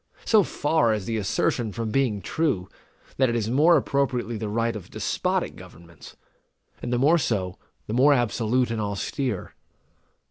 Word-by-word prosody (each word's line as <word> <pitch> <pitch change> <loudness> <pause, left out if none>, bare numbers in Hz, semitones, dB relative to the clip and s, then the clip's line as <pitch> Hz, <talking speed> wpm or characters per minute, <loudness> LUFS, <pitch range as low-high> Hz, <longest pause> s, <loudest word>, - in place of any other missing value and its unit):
So 220 -2 +5
far 145 - +1
is 105 -3 -5
the 115 -1 -2
assertion 110 +2 0
from 115 0 -4
being 110 -7 0
true, 135 - -1 0.5
that 130 -2 +3
it 120 - -1
is 115 -1 -1
more 155 +6 +5
appropriately 130 -4 -1
the 110 -1 -4
right 115 +2 0
of 105 - -8
despotic - - -1
governments; 85 0 -14 0.7
and - - -4
the 120 - +2
more 150 +7 +4
so, 95 - -2 0.3
the 105 - -5
more 135 +5 +5
absolute 120 0 +1
and 115 -1 -2
austere. 105 +2 -3
115 Hz, 155 wpm, -25 LUFS, 105-135 Hz, 0.7 s, So